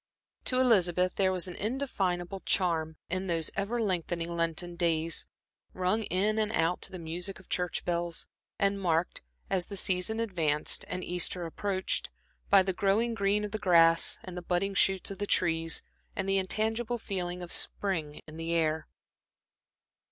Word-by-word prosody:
To 255 - +1
Elizabeth 185 -8 +3
there 190 -1 +2
was 185 -1 -1
an 180 - -6
indefinable 195 -7 -2
charm 165 -5 0
in 185 +2 -2
those 165 -2 +1
ever 210 +5 -1
lengthening 175 -4 -1
Lenten 170 +1 -2
days, 165 -1 +1 0.5
rung 185 +4 +1
in 205 +5 +1
and 215 0 +1
out 165 -2 +1
to - - -2
the 185 - -6
music 175 +3 -4
of 190 - -19
church 180 -1 -1
bells, 170 -1 -1 0.3
and 200 0 +1
marked, 170 -1 0 0.3
as 185 -2 0
the 200 - -3
season 185 +4 +1
advanced 165 -9 0
and 180 0 -3
Easter 180 0 -2
approached, 190 +3 -2 0.4
by 195 -1 +7
the 190 0 -1
growing 205 +5 +2
green 200 0 +2
of 210 - -4
the 215 - -2
grass, 165 -3 +5
and 185 -1 -8
the 180 - -4
budding 180 +3 0
shoots 195 0 +2
of 195 - -7
the 205 - -2
trees, 165 -3 +1 0.3
and 195 - -2
the 195 0 +3
intangible 220 +5 -1
feeling 180 -5 -4
of 175 - -8
spring 160 -7 0
in 155 0 -11
the 165 +1 -2
air. 160 -1 +1
185 Hz, 165 wpm, -30 LUFS, 170-200 Hz, 0.5 s, by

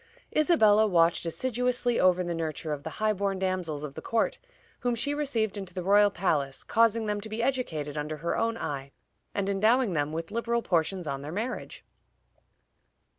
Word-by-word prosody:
Isabella 220 -10 +5
watched 170 -2 +3
assiduously 245 +4 0
over 185 0 +4
the 175 -1 -2
nurture 160 -1 -3
of 145 - -5
the 160 - -5
high 215 0 +2
born 195 -1 -1
damsels 185 -6 -2
of 145 -2 -6
the - - -7
court, 225 -1 0 0.4
whom 245 -1 0
she 235 +5 0
received 235 -9 -1
into 195 -2 -7
the 180 - -3
royal 205 +2 +5
palace, 150 -8 -1
causing 230 0 +2
them 210 -1 -1
to 220 - -8
be 220 +2 -2
educated 160 - -2
under 150 +1 -3
her 170 +3 -2
own 230 0 0
eye, 140 -5 -5 0.4
and 200 -1 0
endowing 215 +3 +3
them 145 -1 0
with 165 +3 -5
liberal 235 +1 -1
portions 175 +1 0
on 140 -2 -3
their 145 +2 -6
marriage." 225 +8 -5
195 Hz, 180 wpm, -28 LUFS, 165-230 Hz, 0.4 s, Isabella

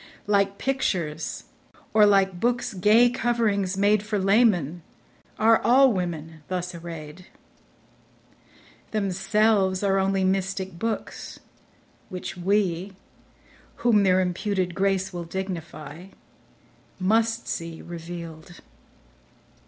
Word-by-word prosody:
Like 200 -1 +1
pictures, 175 - -2 0.5
or 210 -1 +6
like 195 -3 +3
books' 240 0 0
gay 210 +6 +5
coverings 220 -6 0
made 205 +1 +3
For 210 0 -2
laymen, 190 - +2 0.6
are 225 +1 +4
all 255 +2 +5
women 165 -4 -4
thus 180 -1 -3
array'd. 165 0 -9 1.6
Themselves 200 -1 +1
are 195 -1 +2
only 195 0 +1
mystic 190 -1 -1
books, 225 -1 -4 0.7
which 180 -1 -6
we 190 0 0 0.9
Whom 220 -4 +5
their 185 -1 +4
imputed 185 0 -1
grace 195 0 0
will 175 -1 -5
dignifyMust 170 -2 -6 1.3
see 165 -1 -5
reveal'd. 170 0 -9
190 Hz, 90 wpm, -25 LUFS, 175-210 Hz, 1.6 s, or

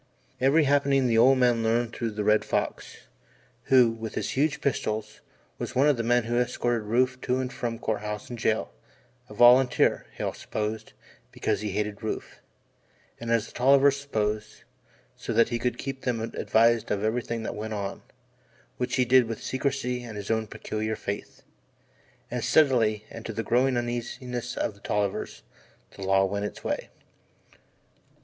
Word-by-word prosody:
Every 140 +5 +4
happening 140 -1 +3
the 115 -2 +3
old 135 +3 +6
man 120 -2 +3
learned 115 +1 0
through 115 - -2
the 105 -1 -3
Red 105 +1 +3
Fox, - - -3 0.6
who, 125 -3 +5
with 115 -1 -7
his - - -2
huge 145 +2 +1
pistols, 110 -5 -2 0.4
was - - -5
one 135 +3 +4
of 145 - +4
the 115 - -2
men 120 +1 +2
who 120 +1 0
escorted 120 -2 -1
Rufe 125 +3 +1
to 125 - 0
and 130 0 -3
from 115 -1 -3
Court 110 -2 -2
House 105 -1 -5
and 120 -1 -7
jail 110 0 0 0.6
a 105 - -10
volunteer, 125 +3 +5
Hale - - -3
supposed, 110 +1 -4 0.4
because - - -1
he 105 -3 -3
hated 105 +1 -2
Rufe; 110 - -5 0.8
and, 115 - -6
as 115 -3 +2
the - - -13
Tollivers 135 +2 +4
supposed, 110 -6 -3 0.5
so 115 - -5
that 115 +1 +4
he 120 0 -2
could 125 +1 -1
keep 135 0 -5
them 125 -3 -1
advised 115 0 +2
of 105 0 -1
everything 115 +1 -1
that - - -3
went 110 +1 -5
on, 100 -1 -4 0.8
which 125 0 -1
he 125 - +2
did 125 0 +5
with 115 -1 -6
secrecy 130 -2 -2
and 115 -3 -8
his 100 +1 -4
own 110 -1 0
peculiar 110 +1 -4
faith. 100 -1 -6 0.9
And - - -2
steadily 115 -8 +3
and 115 - -8
to 115 - -4
the 115 - -3
growing 125 +2 +2
uneasiness 120 +1 -4
of - - -1
the 100 - -20
Tollivers, 105 -2 -2 0.5
the - - -11
law 95 0 +3
went 100 +1 -2
its - - -7
way. - - -3
115 Hz, 170 wpm, -27 LUFS, 110-125 Hz, 0.9 s, old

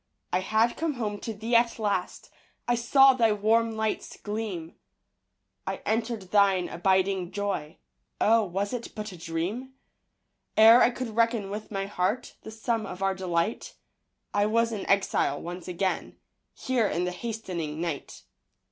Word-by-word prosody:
I - - +3
had 220 +5 +1
come 320 -2 -1
home 210 -4 -3
to 225 - -5
thee 225 +3 -2
at 235 0 +3
last. 205 -5 -2 0.4
I 240 - +3
saw 270 +3 +6
thy 230 -3 +3
warm 225 +2 +2
lights 220 -1 -2
gleam. 205 -6 -5 0.9
I - - -1
entered 225 -3 -2
thine 195 -3 +4
abiding 190 0 +1
joy, 195 -6 -3 0.4
Oh, 225 +1 +4
was 200 +3 -2
it 240 -1 -5
but 215 -1 -5
a - - -9
dream? 180 +11 -4 0.8
Ere 225 +3 +9
I - - +6
could 245 -3 -5
reckon 230 -3 +1
with 210 +1 -6
my 195 -2 -2
heart 205 +5 -2
The - - -9
sum 220 0 -2
of 185 +1 -6
our 195 0 +2
delight, 185 +1 -2 0.6
I 205 0 +2
was 230 +1 +2
an 210 -3 -4
exile 195 -7 +2
once 175 +1 -7
again 185 +1 -2 0.4
Here 250 -5 0
in 175 - -1
the 180 - -1
hasting 180 -7 -5
night. 165 -4 -5
210 Hz, 155 wpm, -27 LUFS, 185-230 Hz, 0.9 s, Ere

